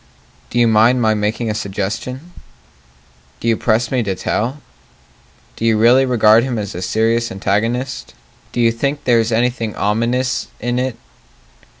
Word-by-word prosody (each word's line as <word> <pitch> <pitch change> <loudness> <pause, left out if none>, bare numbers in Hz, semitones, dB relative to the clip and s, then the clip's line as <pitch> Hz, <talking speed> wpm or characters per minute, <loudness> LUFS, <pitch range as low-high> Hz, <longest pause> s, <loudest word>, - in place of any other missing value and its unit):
Do - - -4
you 120 -1 +4
mind 115 +3 +4
my 110 -2 +2
making 110 +2 -1
a - - -2
suggestion? 110 - -4 1.1
Do - - -4
you 115 - +3
press 115 +1 0
me 130 -2 +1
to 100 -4 -2
tell? 125 +9 -2 1.0
Do - - -7
you 115 -1 +3
really 125 +4 +5
regard 115 -2 +5
him 125 -2 -2
as 100 -2 -4
a 90 - -6
serious 115 +4 0
antagonist? 115 +7 -2 0.4
Do - - -4
you 115 -1 +4
think 140 +5 -2
there 120 -2 +3
is 115 +1 0
anything 115 -1 0
ominous 120 +5 0
in 120 +1 -1
it? 130 -2 -2
115 Hz, 160 wpm, -18 LUFS, 110-125 Hz, 1.1 s, really